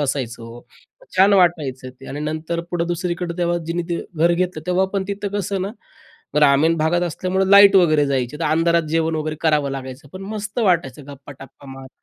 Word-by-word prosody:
बसायचो 120 -4 -4 0.6
छान 195 +2 +5
वाटायचं 150 -8 +1
ते 135 - -12
आणि 145 +2 -6
नंतर 155 +2 -3
पुढं 170 -1 -1
दुसरीकडं 175 0 -3
तेव्हा 175 0 0
जिनी 170 +1 -2
ते 170 - -2
घर 170 +2 +3
घेतलं 175 -2 -2
तेव्हा 180 +1 +2
पण 195 -1 0
तिथं 200 0 -3
कसं 195 -1 -2
ना, 195 - -3 0.7
ग्रामीण 150 +3 +4
भागात 165 +3 +1
असल्यामुळे 185 +3 -1
लाईट 200 0 +8
वगैरे 155 -5 +4
जायची 135 0 -2
तर - - -1
अंधारात 165 +2 +2
जेवण 165 0 0
वगैरे 155 0 -3
करावं 150 -3 +1
लागायचं 135 +2 -8
पण 185 +1 -8
मस्त 210 +2 -6
वाटायचं 160 - 0
गप्पा-टप्पा 140 0 -13
मारत. 135 0 -11
165 Hz, 175 wpm, -20 LUFS, 145-180 Hz, 0.7 s, लाईट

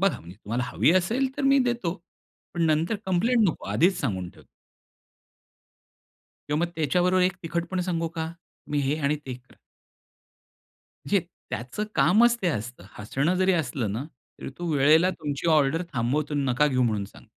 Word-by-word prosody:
बघा 190 -10 +2
म्हणजे 85 +3 -12
तुम्हाला 115 +3 -3
हवी - - +2
असेल 225 +9 +1
तर 290 - -3
मी 275 0 +5
देतो. 235 -8 -1 0.6
पण 170 - 0
नंतर 160 +7 +1
कंप्लेंट 225 +6 +2
नको - - -4
आधीच 180 +2 +3
सांगून 95 - -2
ठेवतो." - - -19 2.0
किंवा 150 - +1
मग 170 - 0
त्याच्याबरोबर 180 +4 +2
एक 185 0 +1
तिखटपण 170 +3 -2
सांगू 170 -2 -1
का? 160 0 -5
तुम्ही 155 -3 -6
हे 140 +2 0
आणि 150 +1 +1
ते 130 - -4 0.2
खा. - - -20 1.5
म्हणजे - - +3 0.3
त्याचं 125 - -4
कामच 235 +5 +4
ते 180 - +1
असतं. 120 - -4
हसणं 135 - 0
जरी 185 +1 +3
असलं 130 - -1
ना 115 +6 -3 0.4
तरी - - -6
तो 175 - -5
वेळेला 155 +5 +5
तुमची 150 -2 -4
ऑर्डर 155 +3 +3
थांबवतो. 135 +6 -1
नका 140 +1 +2
घेऊ 130 -2 +1
म्हणून 105 -4 0
सांग - - -16
160 Hz, 160 wpm, -26 LUFS, 135-180 Hz, 2.0 s, मी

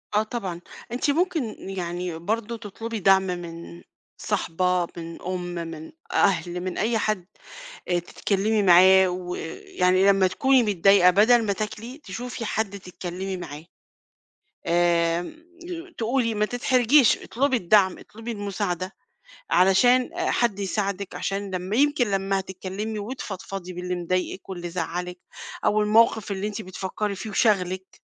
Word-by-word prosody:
آه 210 - +4
طبعًا، 195 -6 -5 0.3
أنتِ 255 +4 +1
ممكن 320 -8 0
يعني 175 -2 -4
برضه 225 +5 -2
تطلبي 225 +1 -6
دعم 195 0 +5
من 170 -1 -6 0.4
صاحبة، 180 -3 0
من 165 0 -8
أم، 180 -1 -4
من 165 -2 -6 0.2
أهل، 180 -2 +1
من 185 -1 -4
أي 225 +2 +1
حد 215 -4 -1 0.6
آآ، 175 -1 +2
تتكلمي 205 +4 0
معاه 185 +1 +7
ويعني 180 +1 0
لمّا 195 -1 +5
تكوني 265 +7 +3
متضايقة 195 -2 +5
بدل 225 +5 +5
ما 205 - +1
تاكلي، 220 +5 -5
تشوفي 240 +4 -6
حد 210 -2 -2
تتكلمي 185 +1 -5
معاه. 155 -3 -8 1.0
آآ، 170 0 +2 0.7
تقولي 230 0 0
ما 210 0 +1
تتحرجيش 250 +2 +4
اطلبي 265 +2 0
الدعم 190 -2 +3
اطلبي 225 +2 -8
المساعدة، 200 -3 -3 0.6
علشان 245 +8 +4
حد 235 -5 +1
يساعدِك، 200 -1 -2
عشان 195 0 -3
لما 185 +4 -2
يمكن 280 -4 +2
لما 195 0 0
هتتكلمي 190 +3 -5
وتفضفضي 195 -5 -6
باللي 180 0 -3
مضايقِك 185 +2 -2
واللي 175 -2 -5
زعلِّك 180 +1 -4 0.5
أو 215 - +3
الموقف 215 -1 +3
اللي 195 +1 -3
أنتِ 210 +1 -4
بتفكري 190 +2 -4
فيه 215 +3 -6
وشاغلِك، 190 -3 0
195 Hz, 125 wpm, -25 LUFS, 180-220 Hz, 1.0 s, معاه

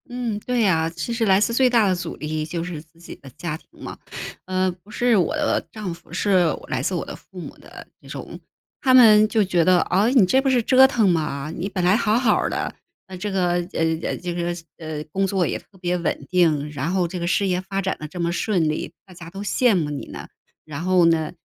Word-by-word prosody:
嗯， 240 -4 -3
对 245 +2 -1
呀， 165 -6 +2
其 170 +8 -5
实 230 -1 0
来 190 -2 +4
自 225 +3 +1
最 255 +1 +4
大 230 -4 +3
的 185 - +2
阻 175 - -5
力 155 0 -3
就 165 +1 -4
是 170 -3 -6
自 160 +1 -25
己 170 - -10
的 140 - -14
家 170 -3 -3
庭 - - -28 0.2
嘛。 - - -7 0.5
呃， 185 0 0
不 205 - -20
是 240 +2 +2
我 180 -6 +1
的 - - 0
丈 210 -5 -5
夫， 170 - -16
是 185 0 +2 0.2
来 - - -2
自 - - -1
我 - - -3
的 - - -7
父 - - -13
母 - - -8
的 - - -13
这 - - -17
种。 - - -8 0.4
他 260 -2 +3
们 215 -4 +7
就 215 0 +2
觉 180 -3 +2
得： 185 +2 +5 0.2
“啊， 195 +4 +4
你 250 -6 +5
这 260 +9 +3
不 270 - +1
是 255 -2 +3
折 265 +3 +6
腾 235 -6 +2
吗？ 155 -4 -1
你 190 +4 -4
本 185 -2 -3
来 180 +3 +4
好 220 -1 +2
好 240 -4 +3
儿 - - 0
的， - - -3 0.3
那 190 - -9
这 205 +3 -4
个 185 -2 +1 0.2
呃， 160 0 -1
这 175 -1 -5
个 175 0 -2 0.2
呃， 155 -2 -6
工 195 +2 0
作 190 -2 +1
也 - - -2
特 195 - -23
别 180 0 -1
稳 175 - -3
定， 155 -5 +2
然 145 +3 -3
后 185 -2 +1
这 180 +2 -6
个 170 - -2
事 180 +3 +1
业 180 -1 0
发 195 +1 -4
展 190 0 -1
得 155 - -6
这 180 +4 -9
么 170 0 0
顺 175 -3 0
利， 155 - -3
大 185 - -15
家 170 -1 -10
都 195 +3 -8
羡 230 +2 +2
慕 155 -5 -1
你 145 - -6
了， - - -9 0.4
然 150 -1 -6
后 185 -1 +4
呢 160 -2 +2
185 Hz, 265 characters per minute, -22 LUFS, 165-210 Hz, 0.5 s, 们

